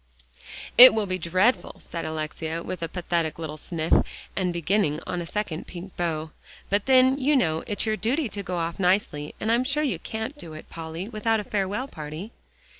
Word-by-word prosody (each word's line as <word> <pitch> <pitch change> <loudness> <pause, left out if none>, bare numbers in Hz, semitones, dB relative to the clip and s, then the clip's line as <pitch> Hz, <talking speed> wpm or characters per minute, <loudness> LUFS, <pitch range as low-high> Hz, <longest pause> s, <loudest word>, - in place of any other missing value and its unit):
"It 255 -1 +12
will 215 -2 +1
be 185 -1 -2
dreadful," 185 +9 +1
said 170 - -6
Alexia, 160 +1 -4
with 180 - -5
a 165 - -1
pathetic 170 -3 -1
little 160 -2 -5
sniff, 160 0 -2 0.4
and 185 -2 0
beginning 170 -2 +1
on 180 -1 -3
a 170 - -6
second 190 -6 -3
pink 180 +1 -9
bow, 160 -2 -2 0.4
"but 200 +3 +1
then, 260 +1 +5
you 290 +2 +3
know, 160 - +1
it's 205 0 0
your 215 -1 0
duty 260 +7 0
to 200 -1 -5
go 180 -2 -4
off 165 +1 -3
nicely, 180 -6 +1
and 220 - 0
I'm 240 +2 +3
sure 285 +3 +1
you 230 - -1
can't 220 - -5
do 160 - -8
it, 155 - -12
Polly, 165 +3 -6
without 225 0 0
a - - -3
farewell 205 +5 -2
party." 155 - -7
185 Hz, 190 wpm, -25 LUFS, 165-220 Hz, 0.4 s, It